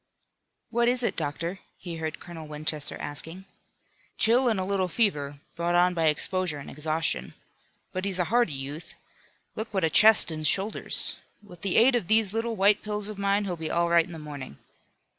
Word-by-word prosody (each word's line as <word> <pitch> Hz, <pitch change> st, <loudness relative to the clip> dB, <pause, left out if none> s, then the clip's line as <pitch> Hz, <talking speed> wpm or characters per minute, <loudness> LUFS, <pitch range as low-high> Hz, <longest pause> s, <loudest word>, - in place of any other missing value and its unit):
"What 235 Hz, 0 st, +2 dB
is 250 Hz, 0 st, +2 dB
it, -, -, 0 dB
doctor?" 165 Hz, +4 st, -3 dB, 0.2 s
he 170 Hz, -2 st, -7 dB
heard 160 Hz, -1 st, -5 dB
Colonel 165 Hz, -3 st, -10 dB
Winchester 150 Hz, 0 st, -2 dB
asking. 165 Hz, +6 st, -7 dB, 0.7 s
"Chill 245 Hz, +3 st, +4 dB
and 215 Hz, -4 st, 0 dB
a -, -, -1 dB
little 195 Hz, -1 st, 0 dB
fever, 150 Hz, -9 st, 0 dB, 0.2 s
brought 170 Hz, +1 st, -1 dB
on 180 Hz, +1 st, +4 dB
by 165 Hz, -2 st, 0 dB
exposure 175 Hz, +1 st, 0 dB
and 140 Hz, -, -9 dB
exhaustion. 155 Hz, -, -2 dB, 0.6 s
But 185 Hz, +1 st, -4 dB
he's 195 Hz, -2 st, -1 dB
a 180 Hz, -, +2 dB
hardy 240 Hz, -10 st, +3 dB
youth. 140 Hz, +4 st, -7 dB, 0.6 s
Look 220 Hz, +1 st, -5 dB
what 190 Hz, -, 0 dB
a 160 Hz, -, +1 dB
chest 215 Hz, -2 st, +7 dB
and 155 Hz, -1 st, 0 dB
shoulders! 195 Hz, +6 st, +1 dB, 0.3 s
With 180 Hz, -5 st, -15 dB
the 195 Hz, -2 st, 0 dB
aid 245 Hz, +3 st, +5 dB
of 230 Hz, -8 st, -1 dB
these 220 Hz, -2 st, +4 dB
little 225 Hz, 0 st, -2 dB
white 200 Hz, +1 st, +3 dB
pills 210 Hz, -1 st, -3 dB
of 210 Hz, -2 st, -8 dB
mine 200 Hz, +1 st, +1 dB
he'll 180 Hz, -3 st, -3 dB
be 160 Hz, -1 st, -5 dB
all 170 Hz, 0 st, +1 dB
right 170 Hz, -1 st, +4 dB
in -, -, -12 dB
the 165 Hz, -, -8 dB
morning. 145 Hz, -, -9 dB
180 Hz, 190 wpm, -26 LUFS, 155-210 Hz, 0.7 s, chest